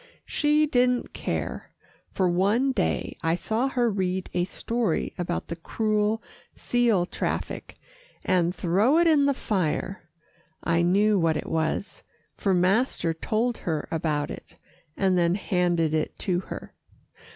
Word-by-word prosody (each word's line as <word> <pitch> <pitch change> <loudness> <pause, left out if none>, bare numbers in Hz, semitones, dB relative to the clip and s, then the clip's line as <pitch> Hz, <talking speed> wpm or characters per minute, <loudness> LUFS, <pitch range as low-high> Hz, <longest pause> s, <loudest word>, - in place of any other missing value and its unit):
She 300 0 +2
didn't 250 -3 +1
care, - - -4 0.4
for 185 - +1
one 205 +10 +2
day 210 -8 -1
I 165 0 +1
saw 225 +8 -1
her 245 -3 +1
read 190 -3 -1
a 175 0 +1
story 225 0 -1
about 175 0 -2
the 170 - -4
cruel 215 +4 0 0.3
seal 235 -7 +2
traffic, - - -4 0.5
and 180 -1 +2
throw 205 - +3
it 340 - +4
in 300 -4 +4
the 280 - +2
fire. 190 -3 -2 0.5
I 170 0 +2
knew 200 +4 +3
what 165 -2 +2
it - - -4
was, 160 +5 -2 0.3
for 195 - 0
master 185 -1 +2
told 225 +8 -1
her 155 -3 -2
about 155 -3 -1
it, - - -10 0.4
and 190 -2 +2
then 170 +1 +3
handed 175 -5 +1
it 155 -1 -1
to 180 -2 0
her. - - -7
190 Hz, 140 wpm, -26 LUFS, 170-230 Hz, 0.5 s, it